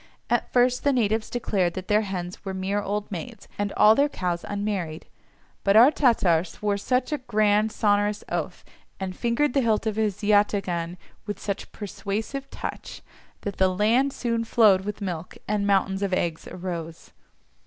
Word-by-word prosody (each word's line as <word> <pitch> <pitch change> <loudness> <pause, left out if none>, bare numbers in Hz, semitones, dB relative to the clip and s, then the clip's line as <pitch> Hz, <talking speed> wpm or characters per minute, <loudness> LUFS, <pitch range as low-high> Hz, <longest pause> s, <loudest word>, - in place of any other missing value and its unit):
At - - +1
first 250 0 +3
the 285 - +3
natives 220 -3 +1
declared 195 -7 0
that 185 -1 -6
their 210 +1 +3
hens 185 -3 -5
were 190 -1 -4
mere 195 +2 -1
old 205 +1 -3
maids 195 +4 -7
and 205 -1 -1
all 215 +1 +7
their 280 +5 +3
cows 175 -8 -2
unmarried, 200 -6 -3 0.6
but 195 0 +3
our 240 +6 +8
Tatar 210 - +3
swore 200 +3 -2
such 255 +6 0
a 300 - -1
grand 215 -3 +2
sonorous 205 -1 +1
oath, - - -4 0.3
and 190 -1 -4
fingered 240 +5 +1
the 275 - +3
hilt 225 -2 +1
of 220 -1 -1
his 210 -1 -1
yataghan 195 -4 +1 0.3
with 205 -2 -4
such 200 -1 -4
persuasive 215 +6 -5
touch, - - -7 0.4
that 200 -2 -5
the 190 0 +4
land 225 +9 +2
soon 230 -3 -1
flowed 210 -5 +4
with 210 0 -5
milk, 180 -3 -5
and 205 -1 0
mountains 195 -1 +2
of 195 -2 -1
eggs 170 -3 -2
arose. 170 -3 -6
205 Hz, 165 wpm, -25 LUFS, 190-225 Hz, 0.6 s, our